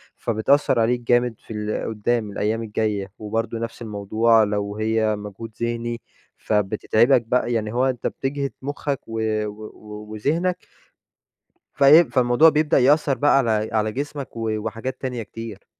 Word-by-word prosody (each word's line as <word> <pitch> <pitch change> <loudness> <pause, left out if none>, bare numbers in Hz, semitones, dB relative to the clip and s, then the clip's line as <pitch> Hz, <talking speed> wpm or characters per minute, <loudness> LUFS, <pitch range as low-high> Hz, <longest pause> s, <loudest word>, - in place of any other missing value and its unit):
فبتأثر 120 +3 +1
عليك 120 +2 +1
جامد 120 0 +2
في - - -10
ال 105 +1 -3
قدّام 110 0 -1
الأيّام 110 +3 -1
الجايّة، 105 -3 -2
وبرضو 110 +2 -3
نفس 115 +1 -6
الموضوع، 110 +1 +2
لو 105 -1 -2
هي 110 0 +1
مجهود 105 +2 -8
ذهني 120 0 -2 0.4
فبتتعبَك 110 +4 +2
بقى، 120 +1 0
يعني 110 -1 -2
هو 125 +2 +2
أنت 130 -2 -1
بتجهد 140 0 -3
مخّك 140 0 -3
و 115 0 -4 0.3
و 105 +1 -9
و 105 0 -10
وذهنك 165 - -1 1.1
فإيه، 145 +4 +7
فالموضوع 125 +2 +4
بيبدأ 150 -1 +2
يأثر 140 +1 +3
بقى 145 -1 +4
على 110 -4 +1
على 110 -1 +1
جسمَك 140 +1 -5
و 115 -1 -2
وحاجات 115 +4 -5
تانية 125 -3 -3
كتير. 110 -2 -9
115 Hz, 145 wpm, -22 LUFS, 110-130 Hz, 1.1 s, فإيه